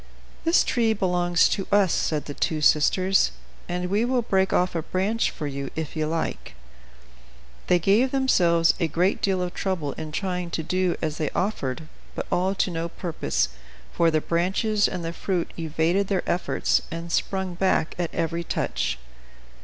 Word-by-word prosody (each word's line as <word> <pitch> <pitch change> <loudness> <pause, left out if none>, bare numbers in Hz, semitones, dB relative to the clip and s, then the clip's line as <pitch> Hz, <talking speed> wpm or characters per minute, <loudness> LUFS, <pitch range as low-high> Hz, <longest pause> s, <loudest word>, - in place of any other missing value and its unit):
"This 330 +1 +5
tree 230 -2 +2
belongs 180 -4 +2
to 195 - -2
us," 200 -3 +4
said 150 -2 0
the 145 - -6
two 155 +2 -1
sisters, 185 +6 +3 0.4
"and 180 +1 -2
we 205 +4 +1
will 245 0 +1
break 190 -3 +1
off 180 +1 +2
a 165 - -1
branch 195 +8 0
for 150 - -6
you 140 -1 -4
if 160 -1 -4
you 155 -1 0
like." 155 - -3 1.1
They 180 - +5
gave 200 +9 +3
themselves 175 -11 +3
a 170 - +2
great 175 +6 +1
deal 190 -2 +1
of 180 - -4
trouble 175 -7 -2
in 155 -1 -7
trying 180 +1 -2
to 160 - -3
do 185 +2 0
as 155 -1 -2
they 155 - 0
offered; 160 -7 -2 0.3
but - - -3
all 185 +2 +1
to 190 - 0
no 165 0 -3
purpose, 165 - -1 0.4
for 165 - +3
the 155 -1 +1
branches 195 +6 +1
and 175 -2 -4
the 165 - -3
fruit 180 -1 -2
evaded 165 +5 +1
their 195 -2 -1
efforts, 180 - +1
and 165 +1 -6
sprung 190 +1 -1
back 180 -2 +1
at 175 -2 0
every 170 +1 -2
touch. - - -2
175 Hz, 170 wpm, -25 LUFS, 165-195 Hz, 1.1 s, This